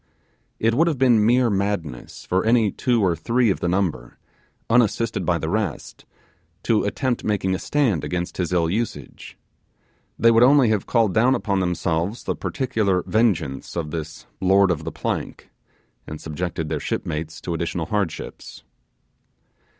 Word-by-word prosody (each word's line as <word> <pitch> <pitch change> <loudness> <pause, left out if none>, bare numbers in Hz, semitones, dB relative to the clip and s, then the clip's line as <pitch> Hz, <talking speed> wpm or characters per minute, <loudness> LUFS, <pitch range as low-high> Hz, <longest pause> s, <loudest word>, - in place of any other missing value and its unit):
It 115 +1 +1
would 165 +8 +3
have 160 -4 0
been 120 -4 +4
mere 120 +1 +3
madness 95 -10 -3
for 95 +1 0
any 115 -2 +3
two 120 0 0
or 85 -2 +2
three 115 +7 +1
of - - -2
the - - -1
number, 85 -10 -2 0.5
unassisted 115 -1 +1
by 90 -2 +2
the 80 - -4
rest, 105 +3 -3 0.6
to 110 -3 +2
attempt 125 +4 -1
making 100 -3 0
a 95 - -2
stand 125 - 0
against 90 0 -3
his 90 -2 -2
ill 85 -2 +2
usage. 90 - -5 0.8
They 115 +1 +5
would 115 0 +4
only 130 -1 +6
have 105 -3 0
called 115 -5 +2
down 125 +4 +4
upon 100 -5 -1
themselves 90 +3 -1
the - - -2
particular 105 -9 -1
vengeance 100 - 0
of 80 -3 -3
this 80 -1 -6
'Lord 95 0 +4
of 80 -2 -3
the - - -3
Plank', - - -5 0.6
and 75 - -7
subjected 80 0 -4
their 75 -1 -2
shipmates 80 +3 -4
to 85 - -4
additional 85 0 -2
hardships. 100 -3 -4
100 Hz, 155 wpm, -22 LUFS, 85-115 Hz, 0.8 s, only